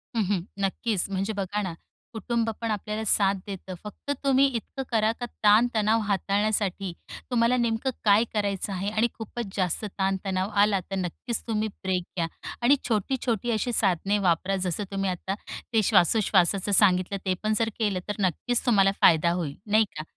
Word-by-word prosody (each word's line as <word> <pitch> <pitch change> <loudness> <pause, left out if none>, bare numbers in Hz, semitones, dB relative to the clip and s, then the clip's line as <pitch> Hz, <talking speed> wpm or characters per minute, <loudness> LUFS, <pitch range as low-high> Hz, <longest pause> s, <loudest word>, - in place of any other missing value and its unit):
हं, 225 - +2
हं, 195 -1 0 0.2
नक्कीच 200 0 0
म्हणजे 195 +3 -2
बघा 205 +1 -2
ना, 185 -4 -4 0.4
कुटुंब 230 +1 -1
पण 225 -1 -1
आपल्याला 210 +1 -3
साथ 200 -1 +4
देतं. 190 -1 -7
फक्त 210 +7 -6
तुम्ही 275 0 +4
इतकं 265 +2 -5
करा 220 -1 +2
का 245 - -3 0.2
ताण-तणाव 220 +1 +4
हाताळण्यासाठी 200 -1 0 0.4
तुम्हाला 240 +1 +3
नेमकं 235 +1 0 0.2
काय 210 +2 +5
करायचं 200 -1 -1
आहे 195 +2 -2
आणि 220 +2 +1
खूपच 225 -2 -7
जास्त 185 +2 0
ताण-तणाव 190 0 -2
आला 205 -2 +3
तर 195 - -3
नक्कीच 190 +6 -3
तुम्ही 220 -1 0 0.2
ब्रेक 185 -1 0
घ्या. 165 -1 0 0.3
आणि 255 +4 +5
छोटी-छोटी 235 +1 -1
अशी 230 +2 -1
साधने 195 0 +2
वापरा. 185 +1 +1
जसं 185 +1 -1
तुम्ही 195 -1 -1
आता 190 +2 -3 0.4
ते 220 - +4
श्वासोश्वासाचं 195 +1 +3
सांगितलं 190 -1 +4
ते 185 - +1
पण 215 0 +1
जर 225 - +1
केलं 205 -4 0
तर, 210 - -1
नक्कीच 200 +6 +1
तुम्हाला 195 -5 +4
फायदा 165 +1 +5
होईल, 170 -5 -3 0.2
नाही 215 0 +5
का. 155 - -4
205 Hz, 165 wpm, -26 LUFS, 190-225 Hz, 0.4 s, काय